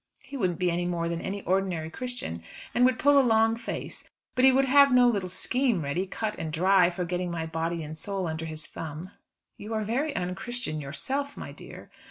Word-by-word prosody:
He 280 Hz, -, -10 dB
wouldn't 185 Hz, -, 0 dB
be 180 Hz, -1 st, +1 dB
any 175 Hz, +1 st, -1 dB
more 170 Hz, -1 st, -1 dB
than 170 Hz, 0 st, -2 dB
an 200 Hz, +1 st, -4 dB
ordinary 180 Hz, -4 st, 0 dB
Christian, 245 Hz, -, -5 dB, 0.3 s
and 245 Hz, -, +4 dB
would 255 Hz, 0 st, +3 dB
pull 285 Hz, 0 st, +5 dB
a -, -, +7 dB
long 225 Hz, -2 st, +3 dB
face; 230 Hz, -, -6 dB, 0.3 s
but 255 Hz, -, +1 dB
he 265 Hz, -, +8 dB
would 270 Hz, +1 st, +3 dB
have 280 Hz, +1 st, +6 dB
no 250 Hz, -1 st, +6 dB
little 200 Hz, -6 st, 0 dB
scheme 235 Hz, -, +1 dB
ready, 170 Hz, +7 st, -1 dB
cut 215 Hz, +2 st, -3 dB
and 160 Hz, -, -3 dB
dry, 180 Hz, +2 st, +4 dB
for 180 Hz, 0 st, -3 dB
getting 180 Hz, +1 st, -2 dB
my 165 Hz, -1 st, -3 dB
body 165 Hz, +1 st, -2 dB
and 155 Hz, +1 st, -7 dB
soul 195 Hz, +3 st, -3 dB
under 160 Hz, 0 st, -3 dB
his 155 Hz, -1 st, -5 dB
thumb." 160 Hz, +3 st, -7 dB, 0.5 s
"You 215 Hz, +2 st, -5 dB
are 215 Hz, -, 0 dB
very 270 Hz, +8 st, -1 dB
unchristian 185 Hz, -1 st, -3 dB
yourself, 265 Hz, -, -3 dB
my -, -, -7 dB
dear." -, -, -12 dB
185 Hz, 210 wpm, -27 LUFS, 165-245 Hz, 0.5 s, he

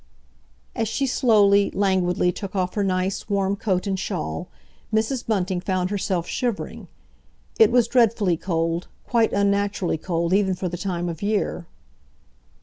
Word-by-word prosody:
As 225 Hz, -2 st, 0 dB
she 250 Hz, +6 st, -1 dB
slowly, 205 Hz, -6 st, +4 dB
languidly 185 Hz, -2 st, +2 dB
took 195 Hz, +2 st, -7 dB
off 180 Hz, -1 st, 0 dB
her 205 Hz, -, 0 dB
nice, 190 Hz, +2 st, -1 dB
warm 200 Hz, -1 st, +1 dB
coat 190 Hz, -2 st, -1 dB
and 195 Hz, -2 st, -1 dB
shawl, 80 Hz, -, -4 dB, 0.4 s
Mrs. 225 Hz, +4 st, 0 dB
Bunting 190 Hz, -4 st, 0 dB
found 185 Hz, 0 st, -1 dB
herself 185 Hz, -4 st, -1 dB
shivering. 240 Hz, +2 st, -3 dB, 0.7 s
It 445 Hz, -, +7 dB
was 245 Hz, -2 st, +4 dB
dreadfully 225 Hz, -7 st, +3 dB
cold, 165 Hz, 0 st, -2 dB, 0.2 s
quite 230 Hz, -2 st, +2 dB
unnaturally 200 Hz, -4 st, 0 dB
cold 170 Hz, 0 st, -1 dB
even 195 Hz, -1 st, +2 dB
for 180 Hz, -, -3 dB
the 175 Hz, -, -4 dB
time 175 Hz, -1 st, -3 dB
of 165 Hz, -2 st, -5 dB
year. 205 Hz, -4 st, -1 dB
195 Hz, 145 wpm, -23 LUFS, 180-210 Hz, 0.7 s, It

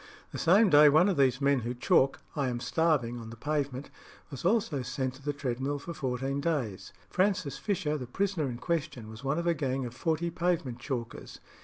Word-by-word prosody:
The -, -, -5 dB
same 195 Hz, +3 st, +5 dB
day 150 Hz, 0 st, +8 dB
one 155 Hz, +7 st, +5 dB
of 190 Hz, -, +1 dB
those 130 Hz, -3 st, +3 dB
men 140 Hz, -1 st, +3 dB
who 120 Hz, +1 st, -4 dB
chalk 130 Hz, +2 st, +2 dB
"I 140 Hz, -3 st, 0 dB
am 120 Hz, -1 st, -3 dB
starving" 130 Hz, -3 st, +1 dB
on 115 Hz, -1 st, -8 dB
the 115 Hz, -, -9 dB
pavement 140 Hz, +1 st, -3 dB, 0.4 s
was 135 Hz, -, -7 dB
also 180 Hz, -, +1 dB
sent 125 Hz, +1 st, -3 dB
to 130 Hz, -, -15 dB
the 145 Hz, +1 st, -1 dB
treadmill 135 Hz, 0 st, -2 dB
for 170 Hz, +4 st, -7 dB
fourteen 135 Hz, 0 st, -2 dB
days. 140 Hz, -, -2 dB, 0.2 s
Francis 185 Hz, -7 st, 0 dB
Fisher, 170 Hz, -8 st, -1 dB
the 125 Hz, -, -6 dB
prisoner 180 Hz, 0 st, -1 dB
in 120 Hz, -, -5 dB
question, 145 Hz, -6 st, -3 dB
was 110 Hz, +4 st, -11 dB
one 140 Hz, +3 st, 0 dB
of 170 Hz, -, -2 dB
a 170 Hz, -, +3 dB
gang 135 Hz, -4 st, -2 dB
of 120 Hz, -, -6 dB
forty 165 Hz, +5 st, -1 dB
pavement 165 Hz, -8 st, -1 dB
chalkers. 120 Hz, -3 st, -5 dB
140 Hz, 200 wpm, -29 LUFS, 125-165 Hz, 0.4 s, day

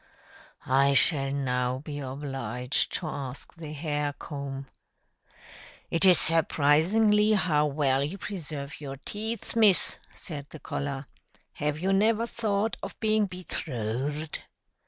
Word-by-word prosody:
"I 140 Hz, +1 st, +4 dB
shall 135 Hz, -2 st, +6 dB
now 125 Hz, -2 st, 0 dB
be 145 Hz, +1 st, -6 dB
obliged 135 Hz, -1 st, -2 dB
to 180 Hz, -, -3 dB
ask 140 Hz, -3 st, -6 dB
the 160 Hz, -3 st, -8 dB
hair 150 Hz, -1 st, -2 dB
comb. 140 Hz, -2 st, -6 dB, 1.3 s
It 165 Hz, +3 st, +2 dB
is 180 Hz, -3 st, +7 dB
surprising 165 Hz, +6 st, +3 dB, 0.2 s
how 155 Hz, -7 st, +2 dB
well 140 Hz, -2 st, +1 dB
you 155 Hz, +8 st, -4 dB
preserve 150 Hz, -8 st, -6 dB
your 135 Hz, -2 st, -6 dB
teeth, 220 Hz, +3 st, -4 dB
Miss," 215 Hz, -5 st, +4 dB
said 145 Hz, -4 st, -8 dB
the 155 Hz, -, -10 dB
collar. 140 Hz, -1 st, -4 dB, 0.5 s
"Have 150 Hz, 0 st, -2 dB
you 190 Hz, +4 st, 0 dB
never 220 Hz, +3 st, +3 dB
thought 220 Hz, -2 st, -1 dB
of -, -, -7 dB
being 215 Hz, -2 st, +2 dB
betrothed?" 150 Hz, -, -4 dB
150 Hz, 120 wpm, -28 LUFS, 140-185 Hz, 1.3 s, is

